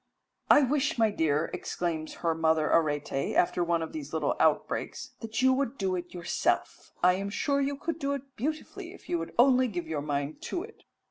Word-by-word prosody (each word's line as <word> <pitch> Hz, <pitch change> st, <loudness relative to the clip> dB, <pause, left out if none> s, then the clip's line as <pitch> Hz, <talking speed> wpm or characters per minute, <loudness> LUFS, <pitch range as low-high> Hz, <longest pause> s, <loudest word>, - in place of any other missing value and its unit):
"I 290 Hz, -, +7 dB
wish, 290 Hz, +3 st, +1 dB
my 225 Hz, -2 st, +3 dB
dear," 160 Hz, -4 st, +1 dB
exclaims 170 Hz, -3 st, -3 dB
her 165 Hz, -, +3 dB
mother 160 Hz, -1 st, +2 dB
Arete, 145 Hz, -3 st, +1 dB
after 175 Hz, 0 st, +3 dB
one 170 Hz, -1 st, +1 dB
of 160 Hz, -, -7 dB
these 310 Hz, -2 st, -6 dB
little -, -, 0 dB
outbreaks, -, -, 0 dB
"that 225 Hz, +2 st, -3 dB
you 260 Hz, 0 st, +6 dB
would 275 Hz, -1 st, -1 dB
do 190 Hz, -2 st, 0 dB
it 175 Hz, -1 st, -5 dB
yourself. 175 Hz, -2 st, -1 dB
I 180 Hz, 0 st, +6 dB
am 195 Hz, +2 st, -3 dB
sure 280 Hz, +7 st, 0 dB
you 280 Hz, 0 st, -1 dB
could 330 Hz, +3 st, -3 dB
do 280 Hz, -2 st, 0 dB
it 275 Hz, -1 st, -7 dB
beautifully 315 Hz, -, -4 dB
if -, -, -16 dB
you 170 Hz, -, +1 dB
would 165 Hz, -, -6 dB
only 255 Hz, +1 st, +5 dB
give 175 Hz, -7 st, -4 dB
your 155 Hz, -2 st, -2 dB
mind 145 Hz, 0 st, -3 dB
to 350 Hz, -, -3 dB
it." 445 Hz, +2 st, -14 dB
195 Hz, 200 wpm, -29 LUFS, -, -, I